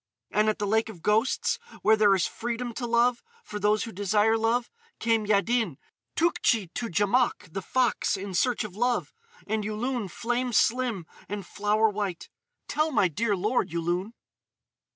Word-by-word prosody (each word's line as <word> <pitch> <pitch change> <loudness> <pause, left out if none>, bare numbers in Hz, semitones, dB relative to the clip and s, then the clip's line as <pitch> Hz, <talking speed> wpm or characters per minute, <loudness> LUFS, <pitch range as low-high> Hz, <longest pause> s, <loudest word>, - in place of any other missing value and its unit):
"And 215 +1 +3
at 215 - 0
the 205 - -2
Lake 220 +2 +1
of 220 - -8
the 170 - -18
Ghosts, 245 - +1 0.2
where 220 - +6
there 205 -2 +5
is 185 - +1
freedom 240 +1 -4
to 240 +1 -4
love, 235 +1 +2 0.2
for 210 - -6
those 210 +1 +2
who 230 - -6
desire 205 +3 +2
love, 230 +2 0 0.3
came 225 -2 +1
Yaddin, 215 - +1 0.4
Tougtchi 230 - +1
to 235 -2 -3
Djamouk 205 -1 +1
the 195 - -3
Fox, 245 -1 +1
in 195 0 -6
search 245 +6 +1
of 205 -3 -8
love—and 250 - -2
Yulun, 215 +1 -2
flame 245 +5 -2
slim, 230 -6 +1 0.2
and 200 -2 -4
flower 210 +3 +1
white.... 205 -4 -3 0.4
Tell 305 +2 +1
my 205 -8 +3
dear 205 +6 0
lord, 210 +7 0
Yulun!" 175 +5 -2
220 Hz, 160 wpm, -27 LUFS, 205-240 Hz, 0.4 s, where